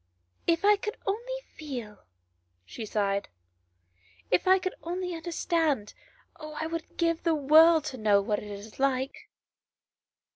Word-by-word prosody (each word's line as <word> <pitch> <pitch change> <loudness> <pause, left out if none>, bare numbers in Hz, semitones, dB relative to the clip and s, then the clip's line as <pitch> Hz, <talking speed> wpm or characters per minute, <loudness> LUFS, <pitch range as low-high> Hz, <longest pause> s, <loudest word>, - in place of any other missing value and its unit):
" 90 - -41
If 335 +4 -2
I 415 0 +6
could 425 +1 -5
only 485 +5 -3
feel," 245 -9 -7 0.6
she 220 - -7
sighed, 200 -1 -1 0.5
" 90 +1 -33
if 180 - -1
I 375 +1 +7
could 370 0 -3
only 360 +1 -3
understand; 325 - -1 0.5
oh, 305 -1 -8
I 315 - -1
would 330 0 -6
give 335 -1 +1
the 330 -2 +2
world 310 +2 +6
to - - -7
know 210 -2 +4
what 205 +1 -1
it 210 - -9
is 205 +3 -9
like." 265 -1 -1
305 Hz, 150 wpm, -28 LUFS, 210-335 Hz, 0.6 s, I